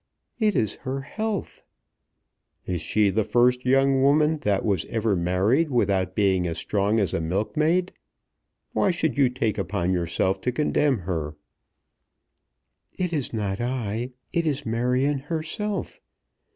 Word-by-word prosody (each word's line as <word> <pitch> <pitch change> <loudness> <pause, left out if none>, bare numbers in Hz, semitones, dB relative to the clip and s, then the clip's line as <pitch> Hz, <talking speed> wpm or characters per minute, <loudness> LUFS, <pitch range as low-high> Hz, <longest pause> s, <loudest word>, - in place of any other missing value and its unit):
"It 215 -3 +2
is 110 -3 0
her 135 0 -4
health." 215 +8 -4 1.0
"Is 90 -2 -2
she 105 -2 +2
the 110 +3 +1
first 125 +3 +2
young 135 +1 +4
woman 150 +3 +3
that 100 -7 0
was 100 -6 +1
ever 110 -2 0
married 95 - +2
without 95 -7 +1
being 95 -3 +2
as 80 0 -3
strong 105 +4 +1
as 100 -5 0
a - - 0
milkmaid? 155 - 0 0.8
Why - - +2
should 160 -6 0
you 140 -3 +4
take 110 -4 -1
upon 95 -2 -1
yourself 90 +2 0
to 125 - 0
condemn 145 -3 +1
her?" 80 -4 -3 1.6
"It 180 -2 -1
is 145 -5 -1
not 105 -2 -2
I. 120 -1 -2 0.2
It 170 -2 +1
is 145 -1 -1
Marion 125 +5 +1
herself. 165 +8 -4
120 Hz, 140 wpm, -25 LUFS, 95-145 Hz, 1.6 s, young